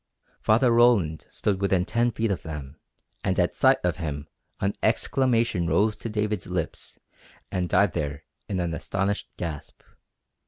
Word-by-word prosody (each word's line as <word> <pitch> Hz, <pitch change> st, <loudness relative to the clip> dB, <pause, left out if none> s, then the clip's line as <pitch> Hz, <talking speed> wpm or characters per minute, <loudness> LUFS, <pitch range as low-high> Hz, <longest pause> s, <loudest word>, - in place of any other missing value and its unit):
Father 120 Hz, +3 st, +4 dB
Roland 115 Hz, -10 st, +3 dB
stood 100 Hz, -2 st, -1 dB
within 95 Hz, -2 st, +2 dB
ten 120 Hz, +3 st, +1 dB
feet 115 Hz, -2 st, -1 dB
of 95 Hz, -, -2 dB
them, 75 Hz, -2 st, -7 dB, 0.4 s
and 95 Hz, -2 st, +1 dB
at 90 Hz, -1 st, +2 dB
sight 130 Hz, 0 st, +5 dB
of 90 Hz, -3 st, 0 dB
him 75 Hz, -3 st, -4 dB, 0.3 s
an 100 Hz, +1 st, 0 dB
exclamation 115 Hz, -9 st, +2 dB
rose 105 Hz, +4 st, +2 dB
to 115 Hz, -, -5 dB
David's 105 Hz, -2 st, -1 dB
lips 90 Hz, -3 st, -4 dB, 0.5 s
and 90 Hz, -1 st, -1 dB
died 100 Hz, -3 st, +3 dB
there 75 Hz, 0 st, -3 dB, 0.3 s
in 95 Hz, -3 st, -1 dB
an 85 Hz, -2 st, -1 dB
astonished 100 Hz, +5 st, -2 dB
gasp. 80 Hz, -4 st, -6 dB
95 Hz, 150 wpm, -26 LUFS, 85-110 Hz, 0.5 s, sight